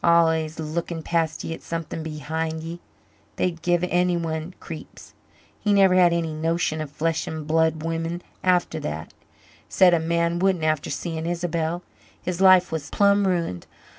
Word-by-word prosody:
Al'ays 160 -2 +3
looking 160 +1 -3
past 165 -1 0
ye 165 - -3
at - - -9
something 165 -1 -4
behind 160 +1 -3
ye. 165 +1 -6 0.6
They'd 170 -3 -1
give 175 0 +1
anyone 175 -1 0
creeps. 160 -2 -10 0.5
He 210 - +1
never 195 -2 +5
had 180 -2 +5
any 165 -2 -1
notion 160 0 0
of 155 - -5
flesh 160 +3 -1
and 155 -1 -5
blood 160 0 +1
women 165 +1 -3 0.2
after 180 -3 +2
that 80 - -5 0.6
said 180 -2 +5
a 170 - +4
man 170 +1 0
wouldn't, 185 -3 +2
after 155 -2 0
seeing 160 +2 -3
Isabel. 170 0 -2 0.4
His 180 0 -4
life 185 -1 +6
was 155 -2 -4
plumb 200 0 +3
ruined. 170 - -1
165 Hz, 155 wpm, -24 LUFS, 160-175 Hz, 0.6 s, life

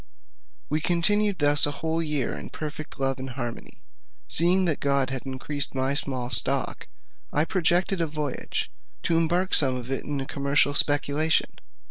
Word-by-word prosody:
We 155 +1 -2
continued 200 +4 +1
thus 145 -1 +8
a 145 - -5
whole 160 +1 -2
year 150 -5 -2
in - - -8
perfect 155 -1 -8
love 135 -1 -1
and 130 0 -6
harmony. 120 -2 -8 0.4
Seeing 180 +3 +3
that 160 -4 -1
God 140 -2 0
had 130 0 -6
increased 135 +2 -4
my 130 +1 0
small 130 -3 -3
stock, - - +2 0.4
I 150 +2 +1
projected 180 +1 0
a 165 - 0
voyage, 150 -3 -4 0.3
to 165 - 0
embark 175 +3 0
some 130 -3 +5
of 125 +1 -7
it 135 - -2
in 145 -1 -4
a 135 - -4
commercial 140 +1 0
speculation. 145 +2 +1
145 Hz, 160 wpm, -24 LUFS, 135-165 Hz, 0.4 s, thus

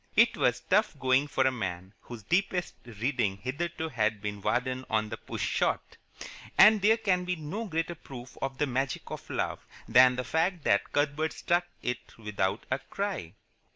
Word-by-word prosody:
It 230 +3 +5
was 125 0 +1
tough 210 -4 +2
going 130 +2 +3
for 135 -2 +1
a 130 - +4
man 95 -5 -5
whose 120 -3 -10
deepest 180 - 0
reading 115 -3 -1
hitherto 160 +8 -3
had 110 -5 0
been 105 0 -5
Vardon 130 +4 0
on 110 -1 +1
the - - -5
Push - - -4
Shot, - - -1 0.6
and 210 +1 +8
there 220 +3 +5
can 185 -5 +1
be 180 0 -1
no 170 +8 -5
greater 165 -2 -2
proof 130 -6 -11
of 135 0 -3
the 150 - +2
magic 135 0 -2
of - - -7
love - - -2 0.2
than 125 +2 +6
the 125 - -2
fact 165 +5 0
that 100 - +2
Cuthbert 150 +2 0
stuck 175 0 0 0.2
it 125 -1 -4
without 105 -4 -2
a 130 - +1
cry. 185 - -4
135 Hz, 175 wpm, -29 LUFS, 115-175 Hz, 0.6 s, and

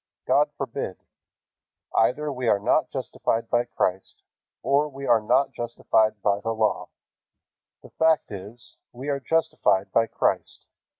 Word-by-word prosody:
God - - +3
forbid. - - -4 1.0
Either 145 +6 +1
we 125 -2 -3
are 105 - +4
not 100 - +1
justified 115 0 -2
by 120 0 +2
Christ, 95 -5 -3 0.4
or 145 +2 +2
we 140 0 -8
are 115 -3 +4
not 135 +6 +2
justified 110 -2 0
by 100 -1 +2
the 115 +2 -2
Law. 110 -1 0 0.9
The - - -14
fact 160 -5 +2
is, 105 +5 -9
we 130 +4 -7
are 140 -1 0
justified 115 -10 +1
by 115 0 +3
Christ. - - -1
120 Hz, 135 wpm, -25 LUFS, 110-140 Hz, 1.0 s, are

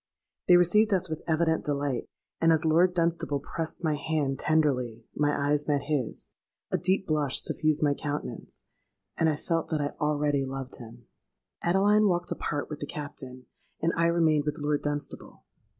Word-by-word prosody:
They 180 - +8
received 210 +5 +4
us 185 -1 -2
with 155 - -3
evident 160 0 +1
delight; 140 -3 -2 0.3
and 165 - +4
as 160 0 +2
Lord 175 +3 +4
Dunstable 165 -4 0
pressed 160 +4 -5
my 155 -2 +2
hand 145 -3 -1
tenderly, 125 -8 +1
my 145 0 +2 0.2
eyes 150 0 +1
met 145 -2 +1
his—a 140 -6 -4
deep 190 +2 +1
blush 150 -4 +1
suffused 155 -1 +1
my 145 -1 +3
countenance—and 140 - -5
I 155 - +1
felt 165 +2 -2
that 155 - 0
I 145 0 -1
already 145 -2 +1
loved 135 0 -5
him. 120 -2 -12 0.6
"Adeline 205 +4 +4
walked 175 -2 0
apart 145 -1 -2
with 150 - -7
the 145 - -5
Captain: 130 -4 -7 0.3
and 165 +1 +1
I 170 0 +3
remained 160 -3 +3
with 150 +1 -2
Lord 145 -1 0
Dunstable. 145 -1 -5
150 Hz, 160 wpm, -28 LUFS, 145-165 Hz, 0.6 s, They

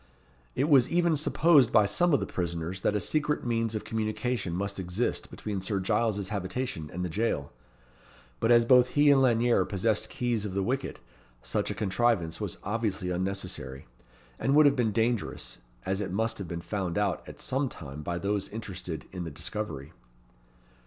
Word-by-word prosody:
It 135 - +1
was 135 -5 +5
even 170 -1 +3
supposed 150 -3 +4
by 105 - +5
some 175 - +2
of 140 - +4
the - - -2
prisoners 85 +1 -3
that 105 - +1
a - - +2
secret 150 - 0
means 115 -2 0
of 105 - -3
communication 110 -2 -2
must 100 +1 -3
exist 95 +6 -2
between 100 -3 -4
Sir 100 +1 -1
Giles's 105 0 0
habitation 100 -4 -3
and 90 +1 -3
the - - -1
jail; 90 -6 -1 0.9
but 115 - +2
as 120 -1 +6
both 125 0 +6
he 145 0 +7
and 135 -1 +5
Lanyere 120 -1 +3
possessed 110 +2 0
keys 120 -4 -1
of 100 -3 -4
the 100 - +1
wicket, 130 +6 -2 0.4
such - - -1
a - - -3
contrivance 100 -4 0
was 100 -5 -3
obviously 100 -3 -1
unnecessary, 90 -8 -4 0.5
and 135 - +2
would 150 0 +7
have 140 -1 +5
been 120 -4 +1
dangerous, 110 - -1 0.3
as 95 +2 -1
it 100 - -3
must 115 +4 -1
have 95 - -5
been 85 0 -5
found 95 -1 -3
out 100 -3 0
at - - -11
some 135 +1 -1
time 75 - -8
by 85 +3 -3
those 100 +2 -1
interested 90 -6 -6
in 90 -2 -5
the 85 - -5
discovery. 80 -2 -5
105 Hz, 180 wpm, -28 LUFS, 90-120 Hz, 0.9 s, he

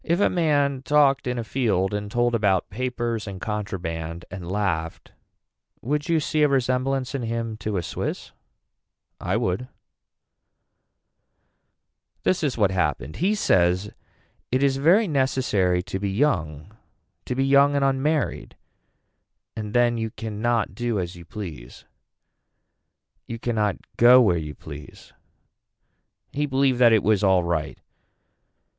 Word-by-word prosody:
If 170 +2 0
a - - +3
man 145 -6 +1
talked 140 -2 +3
in 125 0 -2
a 120 - -2
field 105 -6 0
and 105 0 -3
told 120 +2 +1
about 100 -5 +1
papers 120 -1 -3
and 95 -2 -6
contraband 85 -5 -4
and 90 -1 -7
laughed 90 -5 -2 0.7
would 145 +5 -2
you 165 -1 +3
see 155 +1 -1
a 150 - +6
resemblance 130 0 0
in 135 - -2
him 115 -1 -3
to 105 -1 -3
a 90 - -2
Swiss. - - -5 0.9
I - - -1
would. 95 +8 -2 2.6
This 185 - +1
is 140 -5 -1
what 100 -4 +2
happened. 75 -6 -2
He 200 +5 +1
says 95 - +2 0.6
it 130 +2 +1
is 135 -1 +2
very 180 +10 +4
necesssary 125 - +1
to 95 - -4
be 100 0 -2
young 95 - -1 0.5
to 125 - -3
be 135 +1 +1
young 140 +1 +4
and 140 -1 +2
unmarried 135 +3 -1 1.0
and 105 -1 -5
then 120 -1 +3
you 110 0 -2
can 110 -1 -7
not 120 -1 0
do 120 -2 -2
as 90 -1 -4
you 85 -1 -12
please. 80 - -9 1.4
You 115 - -5
can 120 +1 -3
not 105 -5 0 0.2
go 125 +2 +8
where 105 -8 +4
you 75 -2 -7
please. 75 0 -12 1.2
He 145 +1 -1
believed 135 -2 +1
that 120 -2 +6
it 110 -2 +4
was 105 -1 +2
alright. 85 -5 +1
115 Hz, 140 wpm, -24 LUFS, 95-135 Hz, 2.6 s, go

